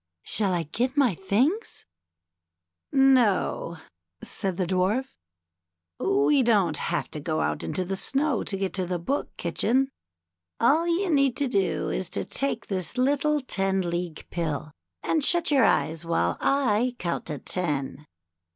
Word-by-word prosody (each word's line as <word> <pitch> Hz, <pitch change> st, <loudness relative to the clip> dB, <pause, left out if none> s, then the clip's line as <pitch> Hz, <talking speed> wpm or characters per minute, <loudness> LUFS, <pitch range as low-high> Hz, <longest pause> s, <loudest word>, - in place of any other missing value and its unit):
" -, -, -59 dB
Shall 205 Hz, -3 st, +1 dB
I 175 Hz, -2 st, 0 dB
get 240 Hz, -, -2 dB
on -, -, -23 dB
my 260 Hz, -7 st, +4 dB
things? 245 Hz, -, -1 dB, 0.6 s
" 85 Hz, 0 st, -61 dB
"No," 250 Hz, -10 st, +3 dB, 0.5 s
said 190 Hz, -3 st, -3 dB
the 185 Hz, -, 0 dB
Dwarf, 190 Hz, +9 st, 0 dB, 0.8 s
"we 390 Hz, -8 st, +3 dB
don't 200 Hz, -10 st, +2 dB
have 175 Hz, -, -2 dB
to 150 Hz, -, -4 dB
go 155 Hz, +1 st, -2 dB
out -, -, -1 dB
into 185 Hz, -, -2 dB
the 195 Hz, +2 st, -2 dB
snow 275 Hz, +4 st, 0 dB
to 195 Hz, -, -3 dB
get 195 Hz, -1 st, -2 dB
to 185 Hz, -2 st, -2 dB
the 180 Hz, 0 st, -1 dB
Book 265 Hz, +12 st, -3 dB
Kitchen. 240 Hz, +11 st, +1 dB, 0.7 s
All 320 Hz, +4 st, +3 dB
you 350 Hz, +2 st, +1 dB
need 275 Hz, -4 st, +2 dB
to 285 Hz, -, 0 dB
do 195 Hz, -6 st, 0 dB
is 185 Hz, -2 st, -2 dB
to -, -, -2 dB
take 275 Hz, 0 st, -2 dB
this 190 Hz, +3 st, -2 dB
little 290 Hz, +3 st, +2 dB
Ten 195 Hz, -6 st, 0 dB
League 170 Hz, -2 st, -4 dB
Pill 155 Hz, -3 st, -3 dB, 0.3 s
and 315 Hz, -, +1 dB
shut 345 Hz, +1 st, +3 dB
your 270 Hz, -4 st, +5 dB
eyes 160 Hz, +1 st, +1 dB
while 90 Hz, -, 0 dB
I 250 Hz, -3 st, +1 dB
count 170 Hz, -6 st, -3 dB, 0.2 s
ten." 150 Hz, -4 st, -2 dB
200 Hz, 155 wpm, -26 LUFS, 170-270 Hz, 0.8 s, your